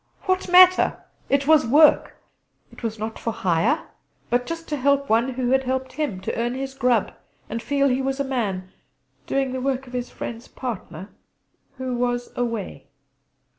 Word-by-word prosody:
What 370 -1 0
matter? 365 +1 +6 0.3
It 275 0 +2
was 310 0 +5
work. 295 +6 +4 0.6
It - - -14
was 225 -1 -3
not 220 +1 -5
for 230 - -2
hire, 200 - 0 0.4
but 245 +1 +1
just 330 0 -5
to 300 - -1
help 280 +1 +2
one 235 +4 +2
who 250 -1 -1
had 265 0 +2
helped 260 +1 -2
him; 290 -12 -2
to - - -3
'earn 240 +2 -1
his 270 0 -4
grub' 250 -5 +1 0.4
and 230 +1 -4
feel 280 +1 +1
he 260 0 +1
was 270 +1 -2
a - - +2
man, 200 -9 -3 0.6
doing 270 -1 0
the 260 - -3
work 270 0 -1
of 250 - -14
his 250 -1 -3
friend's 230 0 -7
partner, 195 -7 -6 0.7
'who 260 -1 -3
was 245 0 -2
away.' 230 - -4
255 Hz, 170 wpm, -23 LUFS, 230-275 Hz, 0.7 s, matter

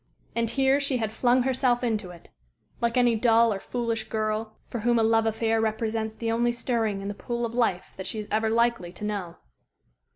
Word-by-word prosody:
And 230 -1 +1
here 270 +3 +3
she 280 -2 0
had 220 -3 -2
flung 245 +2 +3
herself 255 -1 +1
into 215 -5 -1
it, 175 -1 -13 0.5
like 235 +1 +1
any 245 -2 +4
dull 230 0 +4
or 195 - -4
foolish 230 0 -3
girl 215 0 -2
for 240 - -5
whom 235 +2 +2
a 225 - +3
love 225 0 +3
affair 225 0 +1
represents 220 0 -1
the 225 0 -2
only 240 +1 +2
stirring 225 -4 -1
in - - -4
the 205 - -3
pool 235 +3 -3
of 230 - -5
life 225 -7 0
that 190 - -5
she - - -4
is 210 -1 -5
ever 220 +1 +1
likely 235 -5 +1
to 210 - -6
know. 195 -5 -3
225 Hz, 205 wpm, -26 LUFS, 215-240 Hz, 0.5 s, any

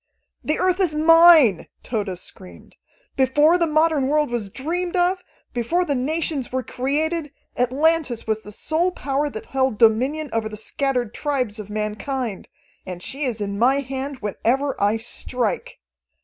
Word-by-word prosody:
"The 305 - 0
Earth 370 0 +1
is 350 -6 +1
mine!" 320 - +6 0.2
Tode 205 -6 -3
screamed. 185 +1 -12 0.4
"Before 295 +6 +4
the 335 - +2
modern 310 -3 +2
world 300 -2 +1
was 225 -5 -3
dreamed 345 - -3
of, 365 +1 +1 0.3
before 285 +10 0
the 290 - 0
nations 290 +1 -2
were 260 0 -2
created, 295 +6 -2 0.2
Atlantis 270 0 +1
was 220 0 -1
the 210 - -11
sole 315 - 0
power 285 -3 -2
that 220 -6 -8
held 265 -4 0
dominion 260 +7 +2
over 225 -1 -1
the 215 - -7
scattered 250 0 -2
tribes 255 -8 -2
of 210 -1 -8
mankind. 215 +2 -4 0.3
And 180 -1 -7
she 280 +2 -3
is 230 -4 -2
in 200 0 -3
my 265 +4 +3
hand 270 0 -5
whenever 260 +7 -1
I 205 +2 +2
strike. 235 0 -2
265 Hz, 150 wpm, -22 LUFS, 225-310 Hz, 0.4 s, mine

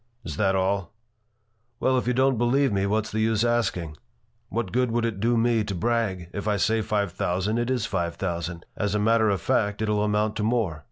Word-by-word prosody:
"Is - - -5
that 95 -2 +2
all?" 95 0 -1 0.8
"Well, 130 - +2
if 125 - 0
you 125 - +2
don't 130 -2 +2
believe 130 +1 +2
me, 100 0 +1
what's 110 +2 0
the 110 - -2
use 110 0 +2
asking? 95 -10 -1 0.5
What 115 -5 -2
good 125 0 +1
would 115 0 0
it 110 -4 -3
do 115 +3 +2
me 115 -1 +2
to 100 -2 -4
brag? 95 -4 -1
If 100 +1 -4
I 105 -1 +2
say 110 +3 +2
five 105 -3 -1
thousand. 95 +6 -1
it 120 +1 -1
is 125 -5 0
five 85 -3 -2
thousand. 85 -2 -4
As 105 -1 -1
a - - +1
matter 110 +1 +3
of 100 -2 0
fact, 105 -5 0
it 110 -1 -1
'll 105 -1 +1
amount 105 +1 0
to 105 - -1
more." 110 -8 0
105 Hz, 220 wpm, -25 LUFS, 95-115 Hz, 0.8 s, matter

